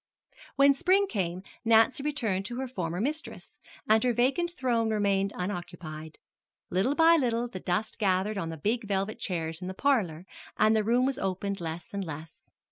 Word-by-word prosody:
When 280 +1 +6
spring 375 +7 +3
came 185 - -3 0.2
Nancy 230 +3 +4
returned 225 -10 -1
to 240 - -5
her 265 +1 -3
former 180 -8 -3
mistress, 300 +8 -4 0.3
and 220 +1 +4
her 250 -1 +2
vacant 270 +9 +1
throne 235 -3 +1
remained 200 -2 +1
unoccupied. 175 -4 -6 0.5
Little 195 +10 +1
by 330 +1 +6
little 240 -4 0
the 190 -6 -7
dust 180 +6 -2
gathered 195 +1 +1
on 165 - -3
the 165 - -6
big 215 +7 -1
velvet 195 +1 -1
chairs 165 -2 -3
in 180 - -5
the 190 - -5
parlor, 190 - +1 0.3
and 215 +1 +4
the 215 - +2
room 240 +4 +3
was 270 0 -1
opened 195 0 -2
less 165 +2 -6
and 200 -1 -2
less. 160 -2 -9
210 Hz, 175 wpm, -28 LUFS, 180-250 Hz, 0.5 s, When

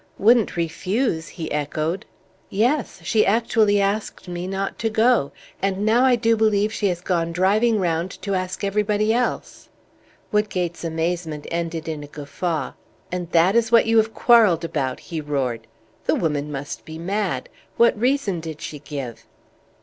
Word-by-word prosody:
"Wouldn't 225 -2 +4
refuse?" 170 +2 -1
he 160 -2 -6
echoed. 155 +4 -2 0.4
"Yes. 235 - 0
She 215 +5 +3
actually 215 -1 +3
asked 200 0 -2
me 175 0 -4
not 195 +1 -3
to 225 - 0
go; 220 - +3 0.3
and 195 +1 0
now 230 +3 +4
I 260 -1 +5
do 230 -1 +2
believe 215 -1 +2
she 205 - 0
has 175 -2 -2
gone 170 -2 0
driving 210 +6 +2
round 170 -1 0
to 200 0 -1
ask 185 +1 -3
everybody 210 +2 +1
else!" 245 +1 -2 0.6
Woodgate's 180 -5 -1
amazement 165 -2 -2
ended 165 -1 -3
in 155 -2 -4
a - - -9
guffaw. 155 +3 -3 0.4
"And 180 -2 -3
that 175 +4 +4
is 235 0 +2
what 235 - +6
you 225 0 +5
quarrelled 220 -6 +4
about!" 135 -5 -2
he 165 -3 -5
roared. 130 -6 -2 0.4
"The - - +2
woman 150 -3 -1
must 140 0 -6
be 160 0 -9
mad. 180 -5 -2 0.3
What 235 0 +5
reason 235 -5 0
did 160 -2 -7
she 150 - -7
give?" 135 -5 -7
185 Hz, 155 wpm, -22 LUFS, 160-215 Hz, 0.6 s, what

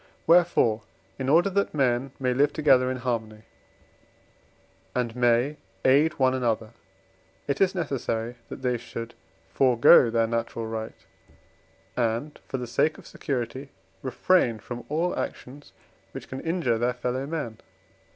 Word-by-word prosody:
Wherefore, 165 -10 +4 0.4
in 130 0 -2
order 175 +6 +4
that 200 -4 0
men 130 -1 +1
may 130 -1 +1
live 140 +3 +2
together 130 -5 +4
in 130 - -2
harmony, 110 -3 -3 1.5
and 120 -2 -1
may 125 +4 +2 0.3
aid 145 +4 +5
one 130 -1 +3
another, 115 -3 -1 0.8
it 140 +4 -1
is 195 0 +3
necessary 120 -7 -2
that - - -8
they 125 -1 +1
should 115 -1 -7 0.4
forego 125 0 +6
their 115 0 +2
natural 115 0 -3
right, 110 0 -6 0.9
and, 120 +5 -1
for 135 - -3
the 125 - -4
sake 135 +6 +1
of - - -14
security, 130 +1 -4 0.3
refrain 130 -2 +2
from 120 +2 -8
all 165 +4 0
actions 140 +3 -6 0.4
which - - -8
can 130 - -6
injure 165 -9 0
their 120 +1 +1
fellow 125 +2 -3
men. 145 -9 -4
125 Hz, 135 wpm, -26 LUFS, 115-145 Hz, 1.5 s, forego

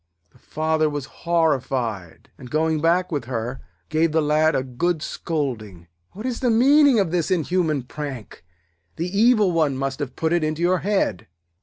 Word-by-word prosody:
The - - -24
Father 155 0 0
was 145 -2 -4 0.2
horrified, 130 - -1
and, 125 - -12
going 155 +1 0
back 175 +3 +2
with 145 -6 -2
her, 120 +1 -4 0.3
gave 160 +1 +1
the 160 - +3
Lad 155 +1 +2
a 130 - 0
good 155 +6 -2
scolding. 110 - -4 0.3
'What 215 +5 -8
is 250 -2 -2
the 250 - +1
meaning 270 +2 +5
of 190 -5 0
this 170 -3 0
inhuman 170 -5 0
prank? 130 -8 -8 0.5
The 175 +4 -4
evil 215 -3 +4
one 155 -5 +1
must 135 0 -3
have 140 -4 -5
put 160 +1 0
it 175 -2 +1
into 155 +2 -2
your 180 +1 +2
head.' 190 - -1
155 Hz, 170 wpm, -22 LUFS, 135-180 Hz, 0.5 s, meaning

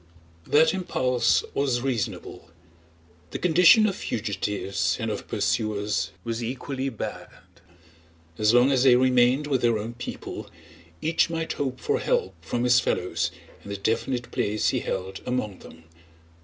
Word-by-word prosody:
That 160 +2 +4
impulse 130 -9 +1
was 130 -4 0
reasonable. 125 -6 -4 0.8
The - - -4
condition 180 +5 +6
of 195 -3 0
fugitives 100 -4 -2
and 115 -1 -2
of 105 - -5
pursuers 105 -6 -1
was 115 0 -3
equally 130 +2 -3
bad. 115 - -6 1.1
As 105 0 +4
long 120 +3 +5
as 130 -2 +3
they 130 -2 +6
remained 125 +2 +3
with 135 -4 0
their 115 -2 +3
own 110 +3 -5
people 120 - -7 0.5
each 165 +1 +2
might 165 -1 -2
hope 130 -3 -3
for - - 0
help 95 - 0
from 120 +9 -2
his 125 0 +5
fellows 90 -6 -1 0.3
and 100 - -9
the 100 - -3
definite 120 +4 -2
place 110 -4 0
he - - 0
held 95 +1 -4
among 115 -6 -2
them. 80 - -14
120 Hz, 140 wpm, -25 LUFS, 105-135 Hz, 1.1 s, condition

